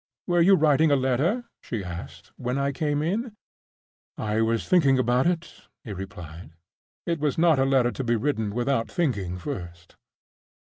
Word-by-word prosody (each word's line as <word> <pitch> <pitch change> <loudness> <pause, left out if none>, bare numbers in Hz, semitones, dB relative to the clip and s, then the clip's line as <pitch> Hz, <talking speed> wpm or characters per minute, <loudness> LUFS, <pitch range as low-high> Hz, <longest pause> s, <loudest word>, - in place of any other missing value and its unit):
"Were 175 -1 +2
you 195 +3 +6
writing 155 -1 +4
a 145 - +4
letter," 140 - +1 0.2
she 110 -4 -4
asked, 85 -3 -8
"when 125 +1 -3
I 140 0 0
came 145 +1 -1
in?" 215 +8 -2 0.8
"I 110 +1 -1
was 115 0 0
thinking 140 -7 +4
about 125 +3 +2
it," 170 -1 -2 0.3
he 110 -7 -6
replied. 85 -4 -9 0.5
"It 170 -2 -1
was 145 -3 0
not 165 -4 +4
a 135 - +3
letter 130 -3 +3
to 135 - -4
be 120 -1 +1
written 110 -3 -1
without 120 -1 0
thinking 100 - -1
first." 90 -6 -8
130 Hz, 165 wpm, -25 LUFS, 105-155 Hz, 0.8 s, you